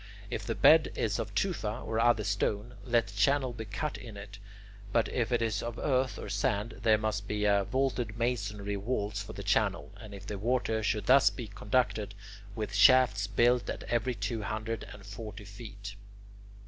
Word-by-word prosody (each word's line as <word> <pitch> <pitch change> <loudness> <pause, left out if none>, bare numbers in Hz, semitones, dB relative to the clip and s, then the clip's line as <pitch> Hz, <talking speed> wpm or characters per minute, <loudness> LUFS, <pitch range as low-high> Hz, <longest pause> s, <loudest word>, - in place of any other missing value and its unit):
If - - -4
the - - -1
bed - - +6
is - - -1
of - - -4
tufa - - -1
or 110 0 -1
other 115 -2 +3
stone, 105 +3 -1
let 120 -2 +2
the 95 - -11
channel 130 +5 +2
be 110 -1 -6
cut 105 +8 -4
in 115 -4 -9
it; 100 -1 -10 0.5
but 115 +1 +2
if 120 -1 -1
it 120 -1 +2
is 110 -1 -1
of 120 0 -5
earth 130 -2 0
or - - -6
sand, 100 +2 -1
there 110 -1 +4
must 105 -1 -2
be 105 0 -1 0.2
vaulted 125 -3 -1
masonry 105 -4 -2
walls 105 -1 -2
for 100 - -8
the - - -7
channel, - - +1
and 110 -2 -11
the 100 +1 -6
water 115 0 0
should 105 0 -1
thus 135 +2 +6
be 120 - -7
conducted, 105 0 -1 0.4
with 110 -1 -4
shafts 125 -7 +5
built 120 +1 +2
at - - -4
every 120 +1 -1
two 115 -1 -3
hundred 110 +1 -3
and 100 - -11
forty 105 0 -8
feet. 100 -1 -9
110 Hz, 180 wpm, -30 LUFS, 100-120 Hz, 0.5 s, bed